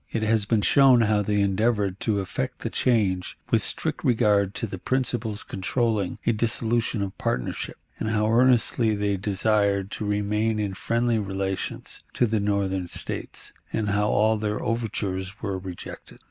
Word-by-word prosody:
It 115 - -1
has 110 -1 +2
been 105 -1 +1
shown 135 -2 +6
how 105 -2 +2
they 105 0 +1
endeavored 100 -1 +1
to 105 -3 0
effect 125 +7 -4
the 115 - -3
change 100 -7 +1
with - - +4
strict - - +1
regard 105 -4 +2
to - - -1
the 95 -4 -7
principles 120 -4 0
controlling 105 0 -1
a - - +4
dissolution 115 -1 +1
of 95 -1 -5
partnership, 60 - -2 0.2
and 110 - -2
how 105 -1 +1
earnestly 120 -2 +3
they 100 -1 0
desired 100 0 +1
to - - -4
remain 105 +2 0
in 105 -2 -2
friendly 115 +3 0
relations 95 -1 -3
to 125 - +2
the 110 -1 0
Northern 100 -2 -1
States, - - -4 0.2
and 105 -2 -1
how 105 +1 +1
all 110 +1 +3
their 105 0 -2
overtures 100 -5 -3
were 95 -2 -2
rejected. 90 -2 -9
105 Hz, 160 wpm, -25 LUFS, 100-115 Hz, 0.2 s, shown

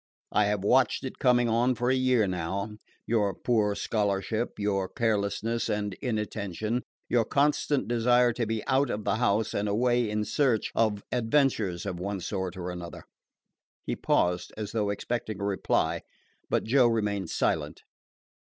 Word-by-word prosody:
I 105 - +3
have 100 -1 0
watched 125 +3 +3
it 130 - -6
coming 125 -3 +4
on 120 +3 +2
for 125 +2 +1
a - - +3
year 130 -4 +3
now 95 +3 -3 0.3
your 105 -5 +1
poor 105 -3 +1
scholarship, 105 +2 -1
your 100 -2 0
carelessness 115 +1 -1
and 105 -2 -1
inattention, 110 -1 -2 0.3
your 120 -2 +3
constant 145 +1 +1
desire 120 +1 +3
to 115 -1 -2
be 110 -1 -2
out 135 +2 +2
of 105 - -3
the 100 +1 0
house 110 -2 +1
and 100 +1 -1
away 120 +2 +2
in 105 0 -1
search 115 +1 +1
of 105 -3 +1
adventures 115 -7 +1
of 90 - -4
one 100 +1 -3
sort 95 0 -4
or 90 0 -4
another." 85 -1 -8 0.8
He - - -2
paused, 90 0 +1
as 105 -1 -4
though 105 -3 0
expecting 110 0 -3
a - - -4
reply; 100 -1 0 0.5
but - - +1
Joe 125 +2 +4
remained 105 -5 -1
silent. - - -1
110 Hz, 155 wpm, -28 LUFS, 100-120 Hz, 0.8 s, coming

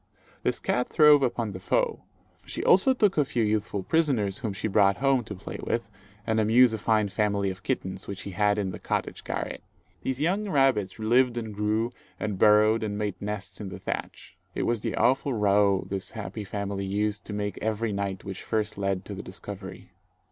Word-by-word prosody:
This - - 0
cat 125 - 0
throve 150 -2 +6
upon 120 -4 0
the 95 - -7
foe. 90 - 0 0.4
She - - -5
also 190 +8 +5
took 210 -9 +2
a - - +5
few 120 -4 -1
youthful 105 -2 -1
prisoners, 125 - +1
whom 110 -4 -2
she 100 +3 -3
brought 100 -1 +4
home 135 -2 +2
to 105 - -6
play 95 - -8
with 115 -3 -2 0.3
and 110 -1 +1
amuse 115 +2 +5
a 110 - -2
fine 110 0 +2
family 100 -1 0
of 95 0 -10
kittens, 95 -8 -3
which 100 - -5
she 100 - -6
had 105 +2 +2
in 100 -3 -1
the - - -7
cottage - - -3
garret. - - -4 0.4
These 130 0 -2
young 195 +7 0
rabbits 135 - +2
lived 120 +2 +3
and 110 -2 -4
grew, 105 +3 0 0.3
and 105 -3 -3
burrowed 105 +2 +5
and 105 -2 -2
made 105 -3 -3
nests 100 -1 -5
in 100 - -5
the - - -7
thatch. - - -6 0.2
It - - -1
was 115 -2 0
the - - -2
awful 130 +1 +2
row 100 -2 +3
this 95 0 -4
happy 105 0 -5
family 100 0 -3
used 105 0 -1
to 105 - -6
make 105 0 -3
every 110 0 -1
night 100 -1 -3
which 95 -1 -6
first 105 -2 -2
led 95 -1 -1
to 105 - -6
the 100 - -6
discovery. 95 -1 -9
105 Hz, 200 wpm, -27 LUFS, 100-115 Hz, 0.4 s, throve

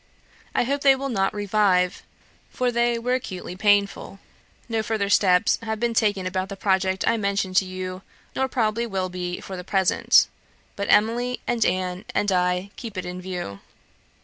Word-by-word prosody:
I - - +3
hope 280 +3 -1
they 275 -1 +6
will 275 +1 -4
not 195 -5 +1
revive, 200 -3 +1 0.5
for 250 -1 -1
they 235 0 +1
were 245 +2 -1
acutely 185 -8 -4
painful. 200 0 +1 0.5
No 225 -1 0
further 215 -2 -1
steps 180 -3 +4
have 220 -1 -3
been 235 0 0
taken 205 -4 +1
about 185 +1 -2
the 200 - -5
project 190 -1 0
I 230 - +3
mentioned 200 -2 -1
to 195 - +4
you, 185 0 -6 0.3
nor 265 - +1
probably 230 -2 0
will 190 -3 -2
be 180 0 -4
for 190 - -7
the 180 - -6
present; 190 0 +3 0.5
but 200 - -3
Emily, 240 +4 +2
and 240 -2 +1
Anne, 185 +1 -1
and 205 - +1
I, 180 +1 0
keep 225 -5 -7
it 185 - -3
in 180 0 -6
view. 180 - -5
200 Hz, 175 wpm, -24 LUFS, 185-230 Hz, 0.5 s, they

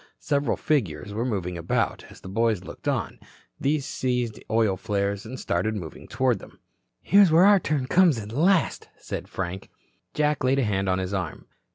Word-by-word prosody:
Several 145 -1 0
figures 100 - -1
were 110 +3 -1
moving 90 -7 -2
about. 85 - -1
As - - -15
the - - -10
boys 110 -1 0
looked - - -10
on, - - -1 0.4
these 140 0 0
seized 125 -5 -2
oil 110 -3 +2
flares 100 +1 -2
and 130 +2 -7
started 110 0 -1
moving 85 -6 -8
toward 125 -5 +1
them. - - -14 0.5
"Here's 200 -3 +6
where 170 +4 +6
our 205 -1 +7
turn 150 -6 -1
comes 170 0 +4
at 105 -1 -6
last," 170 +8 +2
said - - -6
Frank. 95 +1 -5 0.5
Jack 150 -2 +1
laid 130 +1 +3
a 135 - +2
hand 100 -3 0
on 95 - +2
his 95 +1 -3
arm. 90 -5 -4
115 Hz, 180 wpm, -25 LUFS, 95-145 Hz, 0.5 s, our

